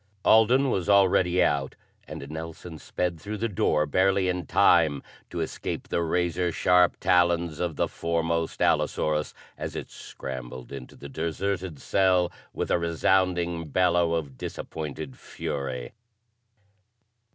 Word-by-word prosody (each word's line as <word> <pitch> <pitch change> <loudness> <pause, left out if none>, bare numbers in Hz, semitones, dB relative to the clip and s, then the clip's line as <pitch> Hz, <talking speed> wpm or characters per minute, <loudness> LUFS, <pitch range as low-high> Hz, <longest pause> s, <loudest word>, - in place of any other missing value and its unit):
Alden 125 +5 +5
was 95 0 -1
already 95 -2 +4
out 70 -2 0 0.3
and 70 - -7
Nelson 80 +1 -7
sped 85 0 -3
through 105 +4 -5
the 115 - -1
door 75 -7 +1
barely 95 +4 +2
in 90 -2 -2
time 80 -7 +4 0.3
to - - -4
escape - - -4
the - - 0
razor 85 +1 0
sharp 90 +1 +3
talons 85 -3 +2
of 85 -3 -2
the - - +1
foremost 85 0 -1
allosaurus 75 0 +1 0.2
as - - -5
it - - -6
scrambled 65 -1 -8
into 70 -2 -9
the 70 - -10
deserted 85 +3 -3
cell 90 -2 +2 0.2
with - - -3
a - - +3
resounding 85 0 +1
bellow 85 +1 +2
of 70 -6 -4
disappointed 75 -3 -6
fury. 65 -3 -5
85 Hz, 130 wpm, -26 LUFS, 75-90 Hz, 0.3 s, Alden